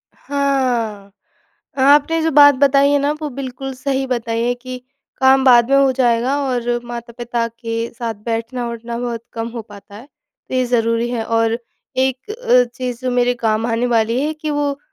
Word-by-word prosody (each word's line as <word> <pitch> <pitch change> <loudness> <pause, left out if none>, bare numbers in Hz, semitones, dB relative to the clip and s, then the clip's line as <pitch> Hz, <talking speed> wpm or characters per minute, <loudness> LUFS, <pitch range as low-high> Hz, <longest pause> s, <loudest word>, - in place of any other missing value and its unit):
हाँ। 250 -8 -1 0.7
आपने 290 +4 +4
जो 325 - +1
बात 285 0 +7
बताई 280 +1 +4
है 285 - +3
ना, 285 +1 0
वो 300 - -2
बिल्कुल 270 0 -6
सही 270 +1 -2
बताई 230 -2 -2
है 245 +1 +1
कि 255 +1 -8 0.4
काम 265 0 +5
बाद 240 0 +6
में 275 - +5
हो 275 -1 +4
जाएगा 250 +1 +1
और 240 -1 -1
माता-पिता 235 0 -4
के 230 0 -4
साथ 230 -2 -3
बैठना-उठना 235 0 -4
बहुत 235 -2 -4
कम 230 0 -4
हो 230 -1 -6
पाता 205 -1 -15
है, 240 +6 -12 0.4
तो - - -5
ये 255 0 +2
ज़रूरी 230 -1 +1
है, 230 -2 -2
और 225 0 +1 0.4
एक 260 +7 -1
अ, 430 - +3
चीज़, 250 -2 -4
जो 255 - -1
मेरे 245 0 +2
काम 225 -1 0
आने 235 +1 0
वाली 230 +1 +1
है 310 - -1
कि 305 0 -5
वो, 290 -1 -1
245 Hz, 175 wpm, -18 LUFS, 230-270 Hz, 0.7 s, बात